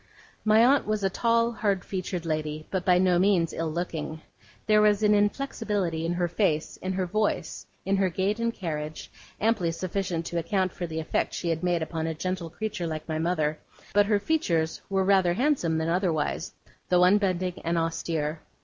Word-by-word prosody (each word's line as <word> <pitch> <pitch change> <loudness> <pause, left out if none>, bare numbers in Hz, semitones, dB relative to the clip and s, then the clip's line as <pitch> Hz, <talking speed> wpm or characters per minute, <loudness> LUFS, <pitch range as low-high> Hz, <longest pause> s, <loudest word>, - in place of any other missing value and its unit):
My 220 +2 +5
aunt 275 -1 +3
was 215 -1 -1
a 195 - +1
tall, 230 +2 +2
hard 205 -5 -1
featured 185 -2 -4
lady, 155 -1 -2
but 190 -2 -1
by 180 -1 +4
no 180 -1 +3
means 185 -4 +3
ill 165 -1 -2
looking. 160 -2 -4 0.5
There 215 -1 +5
was 210 0 +3
an 210 0 +5
inflexibility 205 - 0
in 170 - 0
her 175 0 0
face, 170 -3 0
in 190 0 -3
her 185 0 -1
voice, 210 +4 -2 0.2
in 195 +1 +2
her 190 -1 +2
gait 195 +5 -1
and 230 0 +1
carriage, 155 -6 -5 0.3
amply 210 -6 +1
sufficient 180 -1 -3
to 170 0 -2
account 185 +2 0
for 175 - -4
the 160 0 -4
effect 160 - -1
she 170 - -2
had 165 -1 -1
made 175 -2 +1
upon 160 0 -3
a 160 - -2
gentle 185 0 -3
creature 180 -1 -4
like 155 -1 -5
my 155 -1 -2
mother; 155 -3 0 0.3
but 205 0 +4
her 210 -1 +3
features 175 - 0
were 195 -1 +1
rather 190 -3 +4
handsome 245 - +1
than 160 0 -1
otherwise, 170 -2 -1 0.3
though 180 0 +5
unbending 185 -2 +2
and 170 +1 0
austere. 165 -1 -1
180 Hz, 185 wpm, -27 LUFS, 165-205 Hz, 0.5 s, My